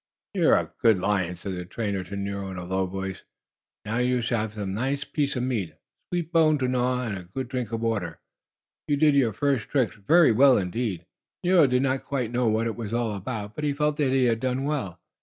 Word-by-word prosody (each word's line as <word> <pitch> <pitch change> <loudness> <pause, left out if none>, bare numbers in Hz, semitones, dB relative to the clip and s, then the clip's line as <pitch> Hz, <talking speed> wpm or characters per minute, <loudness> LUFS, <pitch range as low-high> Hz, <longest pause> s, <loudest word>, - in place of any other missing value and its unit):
"You - - +3
are - - +6
a - - -6
good 110 -3 +5
lion!" 95 -2 0
said 95 +2 -6
the 90 -1 -4
trainer 100 0 -3
to 100 +3 -7
Nero 100 0 -4
in 95 - -7
a 90 - -5
low 95 +1 -1
voice. 95 0 -5 0.6
"Now 110 +3 -2
you 125 -1 +1
shall 120 0 0
have 110 0 -4
a 105 - -3
nice 130 +9 -1
piece 145 -1 -1
of 125 - -1
meat, 110 -11 -2
a - - -33 0.3
sweet 175 -2 -2
bone 160 -3 +4
to 130 -2 0
gnaw, 125 0 0
and 110 -4 -3
a 90 -2 -8
good 120 +8 -5
drink 125 -3 -3
of 115 0 -2
water. 100 -9 -2 0.7
You 145 - +1
did 150 0 +4
your 135 -5 +3
first 135 +2 0
tricks 130 -6 +1
very 155 - +5
well 130 +3 +6
indeed." 95 -2 -2 0.4
Nero 175 -4 +5
did 125 +1 +2
not 135 0 0
quite 125 -5 -2
know 125 0 +1
what 110 +1 +1
it 115 - -2
was 115 -2 -5
all 115 -2 0
about, 105 +1 -5
but 150 - -6
he 145 -1 +1
felt 150 +1 0
that 145 -4 +2
he 130 -1 +3
had 115 -2 +2
done 130 +2 -1
well. 140 - -3
115 Hz, 235 wpm, -26 LUFS, 100-135 Hz, 0.7 s, are